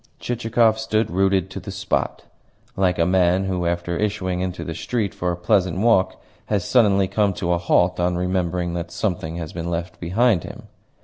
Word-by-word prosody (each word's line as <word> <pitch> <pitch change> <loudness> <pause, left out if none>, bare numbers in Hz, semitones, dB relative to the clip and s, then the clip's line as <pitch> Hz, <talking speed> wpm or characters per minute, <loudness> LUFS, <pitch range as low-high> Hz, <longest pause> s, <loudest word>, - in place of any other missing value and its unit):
Chichikov 115 -2 +1
stood 110 -1 0
rooted 95 0 +1
to - - -5
the - - -9
spot, - - -2 0.5
like 90 -2 +1
a 85 - +3
man 90 +1 +3
who, 90 -2 -1
after 85 0 -2
issuing 100 -4 -1
into 90 0 -3
the 85 - -5
street 105 +4 -2
for 90 0 -2
a 85 - -3
pleasant 90 -1 +1
walk, 105 -2 +2 0.3
has 100 -4 0
suddenly 100 -6 +3
come 100 0 +1
to 90 -1 -1
a 85 - 0
halt 90 +1 +2
on 90 0 +1
remembering 90 -1 -1
that 85 -1 -4
something 85 -2 -3
has 80 -3 -6
been 85 0 -4
left 85 +1 -4
behind 100 +2 +2
him. - - -9
90 Hz, 185 wpm, -22 LUFS, 85-100 Hz, 0.5 s, a